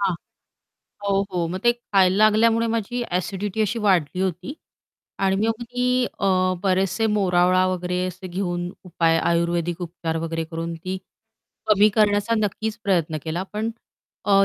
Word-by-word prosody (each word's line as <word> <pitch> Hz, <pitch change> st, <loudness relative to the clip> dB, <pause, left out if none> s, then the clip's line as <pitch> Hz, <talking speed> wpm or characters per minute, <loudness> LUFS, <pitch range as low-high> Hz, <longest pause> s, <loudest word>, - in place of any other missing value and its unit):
हां, 195 Hz, -3 st, +1 dB, 0.9 s
हो, 195 Hz, 0 st, +2 dB
हो, 175 Hz, -2 st, 0 dB
मग 185 Hz, +2 st, -3 dB
ते 240 Hz, -, +6 dB
खायला 195 Hz, -5 st, +2 dB
लागल्यामुळे 225 Hz, +2 st, +4 dB
माझी 230 Hz, +2 st, -2 dB
ॲसिडिटी 195 Hz, +3 st, -2 dB
अशी 215 Hz, +3 st, -1 dB
वाढली 180 Hz, -2 st, +2 dB
होती 185 Hz, -, -2 dB, 0.7 s
आणि 190 Hz, 0 st, +2 dB
मग 225 Hz, +1 st, -1 dB
मी 245 Hz, +1 st, -3 dB, 0.3 s
अ, 200 Hz, -, 0 dB, 0.4 s
बरेचसे 190 Hz, +2 st, +1 dB
मोरावळा 185 Hz, -2 st, +3 dB
वगैरे 180 Hz, -1 st, -2 dB
असे 185 Hz, +1 st, -7 dB
घेऊन 175 Hz, -1 st, -3 dB
उपाय 165 Hz, -2 st, +2 dB
आयुर्वेदिक 170 Hz, +1 st, 0 dB
उपचार 165 Hz, -1 st, -4 dB
वगैरे 165 Hz, 0 st, -2 dB
करून 165 Hz, +1 st, -5 dB
ती 185 Hz, +3 st, -5 dB, 0.7 s
कमी 210 Hz, 0 st, +5 dB
करण्याचा 210 Hz, +1 st, +3 dB
नक्कीच 215 Hz, +2 st, -2 dB
प्रयत्न 170 Hz, -5 st, +1 dB
केला 165 Hz, +3 st, -2 dB
पण 220 Hz, +2 st, -2 dB, 0.5 s
अ, 195 Hz, -1 st, +5 dB
185 Hz, 140 wpm, -23 LUFS, 175-210 Hz, 0.9 s, ते